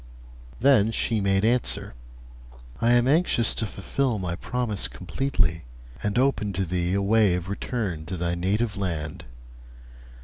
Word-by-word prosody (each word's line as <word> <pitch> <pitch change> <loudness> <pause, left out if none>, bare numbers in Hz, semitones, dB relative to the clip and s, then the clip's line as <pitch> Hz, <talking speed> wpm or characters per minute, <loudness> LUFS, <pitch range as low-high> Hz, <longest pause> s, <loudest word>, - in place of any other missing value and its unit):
Then 115 -4 +4
she 115 -1 0
made 95 +1 +2
answer: 120 - 0 0.9
'I 115 +1 +3
am 120 0 +4
anxious 145 -6 +3
to 110 - -2
fulfil 120 +5 -1
my 90 -3 -3
promise 115 0 -2
completely, 90 - -1 0.4
and 105 +1 -1
open 125 -6 +1
to 95 +1 -1
thee 90 +1 -1
a 100 - +1
way 105 -2 +4
of 90 +1 -4
return 100 -6 -3
to 90 +1 -4
thy 85 0 -1
native 100 +5 0
land. 85 -6 -4
100 Hz, 140 wpm, -25 LUFS, 90-120 Hz, 0.9 s, Then